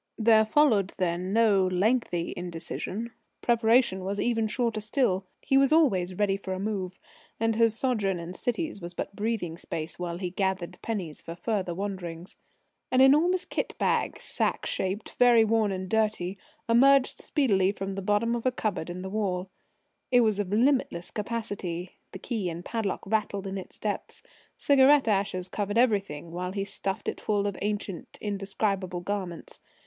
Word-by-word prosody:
There 220 -1 +5
followed 215 -6 +3
then 180 +1 -1
no 205 -4 +4
lengthy 185 -2 0
indecision. 180 +6 -5 0.3
Preparation 230 -4 +3
was 200 +2 -2
even 225 -1 +1
shorter 230 -1 -1
still. 205 -4 0 0.2
He 270 - +4
was 275 +1 +3
always 195 - +3
ready 195 0 +1
for 190 -1 -5
a 185 - -4
move, 190 -3 -3 0.4
and 225 0 +1
his 225 -1 +3
sojourn 215 -8 0
in 170 +1 -6
cities 245 - -3
was 175 +1 -7
but 200 - -5
breathing 205 -6 -2
space 160 +1 -5
while 170 -1 -3
he 180 -1 -4
gathered 190 -2 -2
pennies 190 -9 -4
for 165 - -7
further 185 -2 -2
wanderings. 185 -3 -5 0.6
An 255 - +3
enormous 315 +8 +5
kit - - -3
bag - - 0
sack - - -1
shaped, 195 +3 -2
very 240 -2 +6
worn 220 -2 +2
and 185 0 -4
dirty 215 -4 0 0.3
emerged 270 +3 +5
speedily 200 -10 +2
from 195 -1 -5
the 195 - -4
bottom 210 +4 +1
of 240 +1 -1
a - - +3
cupboard 200 -8 -2
in 180 +1 -5
the - - -4
wall. 190 -3 -2 0.6
It 245 -1 +5
was 215 -3 +2
of 200 -3 -1
limitless 235 -6 +1
capacity. 205 -5 -4 0.2
The - - -7
key 215 -7 -3
and 170 +1 -7
padlock 225 -4 -2
rattled 200 -1 -1
in 195 0 -4
its 190 - -8
depths. - - -4 0.3
Cigarette 280 -1 +5
ashes 195 -3 0
covered 205 +2 -2
everything 200 -10 +1
while 180 +2 -4
he 195 -1 -1
stuffed 195 -1 -4
it - - -3
full 205 -1 0
of 200 -2 -1
ancient, 205 -3 -4
indescribable 195 -2 -2
garments. 185 -3 -5
200 Hz, 165 wpm, -28 LUFS, 185-230 Hz, 0.6 s, very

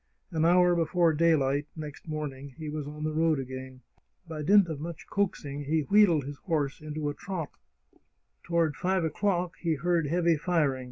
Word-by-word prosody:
An 160 -1 +1
hour 180 +1 +5
before 170 0 +2
daylight 145 -3 +2
next 150 -2 -8
morning 140 -3 -5
he 155 -2 -5
was 150 -1 -4
on 150 +1 -7
the 155 - 0
road 160 0 +2
agfain. 130 0 -7 0.5
By 160 -2 -5
dint 195 +4 +5
of 160 -4 -5
much 165 +1 -7
coaxing 145 -8 -2
he 155 +2 +1
wheedled 175 -2 +4
his 140 +2 -7
horse 150 -6 -2
into 155 0 -4
a - - -3
trot. 175 -2 -5 0.9
Toward 165 -3 0
five 185 +2 0
o'clock 175 0 -1
he 165 -2 0
heard 170 +1 +1
heavy 170 +1 +2
firing. 150 -5 +1
155 Hz, 170 wpm, -28 LUFS, 145-170 Hz, 0.9 s, hour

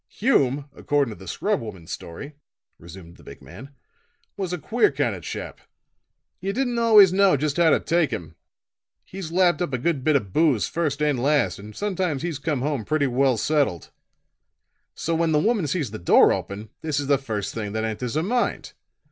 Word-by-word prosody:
"Hume, 145 - +1
according 140 -6 0
to - - -15
the 95 - -12
scrub 205 - -1
woman's 95 -7 -9
story," 140 - -8 0.5
resumed 85 0 -13
the - - -18
big - - -12
man, 135 - -12 0.7
"was 190 -3 -4
a 180 - -2
queer 225 +5 +1
kind 135 -5 -1
of 95 - -7
a - - -17
chap. - - -7 0.8
You 195 +2 -3
didn't 245 -1 -1
always 210 -5 +7
know 195 -4 +4
just 145 +2 -2
how 170 -2 +5
to - - +4
take 170 -3 +1
him. 85 -9 -6 0.7
He's 185 -4 -7
lapped 175 -2 +2
up 175 -6 -2
a - - +1
good 140 +1 -1
bit 155 0 +3
of 100 -9 -1
booze 150 - +2
first 150 -3 -2
and 145 -5 +1
last 145 -3 +1
and 105 +1 -11
sometimes 185 -8 -2
he's 165 -5 -3
come 145 -3 -2
home 145 -5 -1
pretty 145 +6 0
well 130 -1 +2
settled. 140 - 0 1.0
So 165 - -2
when 165 -1 +1
the - - +4
woman 210 -1 +1
sees 140 - -2
the 110 - -7
door 85 - +5
open, 105 +2 -6
this 155 -2 -1
is 145 - -3
the 140 -1 +2
first 110 -7 -4
thing 105 -3 -5
that 110 0 -2
enters 115 +3 -4
her 155 - +1
mind. 240 +6 -1
145 Hz, 200 wpm, -24 LUFS, 115-175 Hz, 1.0 s, always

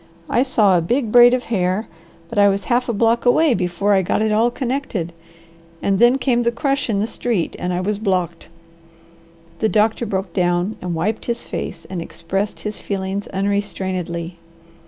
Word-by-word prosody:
I 240 - +3
saw 215 -8 +3
a 175 - +3
big 235 +6 0
braid 245 +1 +8
of 250 - -3
hair, 190 0 -1 0.4
but 205 - -2
I 200 - +7
was 200 0 +1
half 245 +4 0
a - - +1
block 230 +2 +2
away 275 +4 +4
before 185 +1 0
I 195 - +4
got 190 +4 0
it 220 - +1
all 225 +3 +3
connected, 240 - -3 0.7
and 195 -1 0
then 240 +2 +5
came 250 -2 +1
the 235 0 +1
crush 275 +2 -1
in 210 - +1
the 205 - +1
street, 225 -5 -2
and 180 - -2
I 180 0 -1
was 205 +2 -1
blocked." 180 -6 -2 1.1
The 220 - +2
doctor 220 +2 +1
broke 190 -2 -3
down 175 +2 0
and 175 -2 -3
wiped 210 +7 -2
his 235 -1 -2
face - - -6
and 185 -2 -5
expressed 195 +5 -4
his 210 0 -5
feelings 195 0 -3
unrestrainedly. 185 -3 -3
205 Hz, 180 wpm, -20 LUFS, 185-235 Hz, 1.1 s, braid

